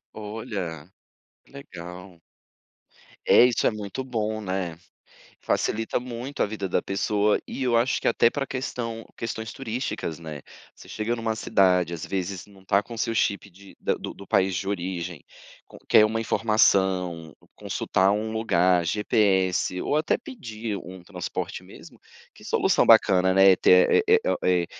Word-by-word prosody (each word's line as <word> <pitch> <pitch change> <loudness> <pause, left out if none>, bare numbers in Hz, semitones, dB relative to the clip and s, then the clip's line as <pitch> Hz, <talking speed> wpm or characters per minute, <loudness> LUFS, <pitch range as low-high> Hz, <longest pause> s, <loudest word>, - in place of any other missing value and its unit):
Olha, 105 - -6 0.5
que - - -26
legal. 90 - -11 1.0
É - - +7
isso, 125 -3 +1
é - - +4
muito 105 +4 -6
bom, 110 -4 -3
né. 95 -4 -3 0.6
Facilita 115 +2 -1
muito 125 +3 -6
a - - +2
vida 100 -2 -4
da 90 - 0
pessoa. 105 +1 +1
E - - -6
eu 120 -2 +2
acho 120 +2 +1
que - - -1
até 115 - +4
pra 135 +3 -2
questão 115 -3 -5
questões 110 -1 -5
turísticas, 120 - -4
né. 80 -4 -8 0.3
Você - - -16
chega 110 +2 -2
numa 115 -1 -2
cidade, 90 -5 +2
às 80 - -6
vezes 95 0 -4
não 100 -2 -18
está 100 +1 +2
com 115 +3 -10
o - - -10
seu 115 - -1
chip 100 -2 0
de 100 +2 -17
da - - 0
do - - -7
do 100 - -12
país 95 -2 +1
de 95 +3 -3
origem 90 -4 -4 0.4
com - - -14
quer 110 - +6
uma 110 +1 -1
informação, 95 -7 +1 0.2
consultar 95 +1 0
um 110 +2 -2
lugar, 90 -5 +2
GPS 95 -1 +1
ou 145 - -1
até 155 +1 +1
pedir 115 - -6
um 90 0 -10
transporte 90 -1 -5
mesmo, - - -15 0.3
que - - -17
solução - - +2
bacana, 95 -1 +5
né. 95 +1 +6
É - - +5
ter 90 - +5
é 445 +1 +5
é - - +2
o - - 0
é 90 -1 +2
100 Hz, 165 wpm, -25 LUFS, 90-115 Hz, 1.0 s, É